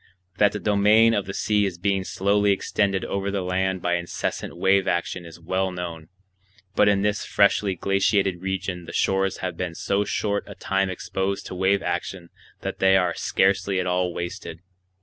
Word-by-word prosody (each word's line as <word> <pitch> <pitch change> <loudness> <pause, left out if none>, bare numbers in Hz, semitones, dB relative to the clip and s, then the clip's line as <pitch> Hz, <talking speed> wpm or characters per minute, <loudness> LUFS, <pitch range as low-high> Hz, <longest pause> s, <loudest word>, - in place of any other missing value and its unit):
That 105 -1 +4
the 105 - -3
domain 105 +3 +4
of 100 -3 -1
the 95 - -4
sea 105 -1 +1
is 90 -3 -6
being 95 +1 0
slowly 100 +2 +1
extended 100 0 0
over 100 0 -2
the 100 -1 -2
land 95 0 -1
by 90 0 +1
incessant 85 0 -4
wave 95 +2 +3
action 85 0 -2
is 85 +1 -12
well 95 +3 -1
known; 85 -3 -6 0.7
but 105 - +5
in 100 -1 +2
this 105 0 0
freshly 100 -1 +2
glaciated 95 0 +1
region 95 -2 -3
the - - -9
shores 95 0 0
have 90 - -3
been 90 -2 -4
so 100 +4 0
short 100 0 -1
a - - -9
time 95 0 0
exposed 95 +1 -3
to - - -7
wave 95 +2 +1
action 85 0 -4 0.3
that - - -5
they 95 0 +5
are 90 -2 +1
scarcely 95 +1 +1
at 90 - -1
all 90 0 0
wasted. 85 -1 -6
95 Hz, 180 wpm, -24 LUFS, 90-100 Hz, 0.7 s, but